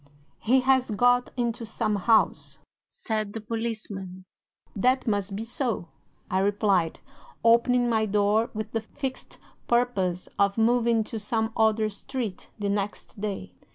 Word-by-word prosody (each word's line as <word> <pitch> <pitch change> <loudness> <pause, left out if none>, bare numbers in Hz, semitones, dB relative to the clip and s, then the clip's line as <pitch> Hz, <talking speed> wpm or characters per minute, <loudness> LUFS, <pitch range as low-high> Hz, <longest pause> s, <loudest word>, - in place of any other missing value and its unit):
"'"He 255 +4 +3
has 260 -1 +3
got 245 +3 +3
into 235 -1 -1
some 220 -1 -1
house," 220 +3 +2 0.3
said 215 -2 -3
the 225 - -4
policeman. 210 -5 -5 0.5
"'"That 255 +6 +2
must 205 -2 -1
be 215 - -3
so," 230 - -3 0.4
I 185 - 0
replied, 195 -4 +1 0.4
opening 240 +1 +4
my 220 -2 +1
door 210 +2 +2
with 215 0 -4
the 225 - -1
fixed 265 +4 -6 0.3
purpose 200 -8 +1
of 200 +1 +3
moving 230 0 +3
to 220 +1 -6
some 220 +1 -1
other 220 0 +3
street 215 -1 -5
the 205 -2 -2
next 200 +1 -3
day. 195 - -4
220 Hz, 135 wpm, -26 LUFS, 200-235 Hz, 0.5 s, opening